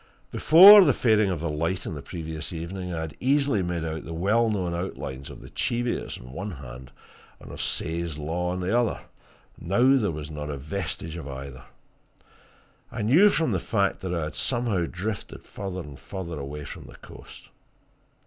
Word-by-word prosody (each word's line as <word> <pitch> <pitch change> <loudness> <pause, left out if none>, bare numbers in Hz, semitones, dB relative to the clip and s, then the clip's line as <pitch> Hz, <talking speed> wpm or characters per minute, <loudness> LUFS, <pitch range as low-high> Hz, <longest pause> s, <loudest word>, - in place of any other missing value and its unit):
Before 195 +5 +9
the 145 -6 +3
fading 110 -4 +3
of 90 -5 -2
the 85 - -2
light 85 +5 -2
on - - -4
the 75 - -6
previous 80 +1 -6
evening, 90 +2 -5
I 80 -2 -3
had 80 -1 -6
easily 140 -4 +2
made 90 -2 -2
out 80 -1 -4
the 80 +2 -7
well 110 +7 +2
known 95 -5 -1
outlines 70 -6 -5
of - - -11
the - - -12
Cheviots 120 0 -2
on 60 - -12
one 95 +9 -5
hand 65 -6 -9 0.5
and - - -11
of - - -6
Says 85 -2 -2
Law 85 +4 -2
on 90 +1 -3
the 95 +5 0
other 120 -2 +1 0.6
now 120 +10 +3
there 105 -4 0
was 75 -2 -6
not 75 -1 -5
a 70 - -4
vestige 80 +2 -5
of 80 - -7
either. 65 -1 -8 1.3
I - - -4
knew 160 - +6
from 165 -5 +1
that - - 0
fact 100 -4 0
that 95 -2 -4
I 85 -3 -1
had 75 +1 -5
somehow 115 -9 0
drifted 100 +3 -5
further 95 -2 -6
and 75 -4 -11
further 85 -5 -6
away 70 +2 -6
from - - -9
the - - -13
coast. - - -14
90 Hz, 185 wpm, -26 LUFS, 75-105 Hz, 1.3 s, Before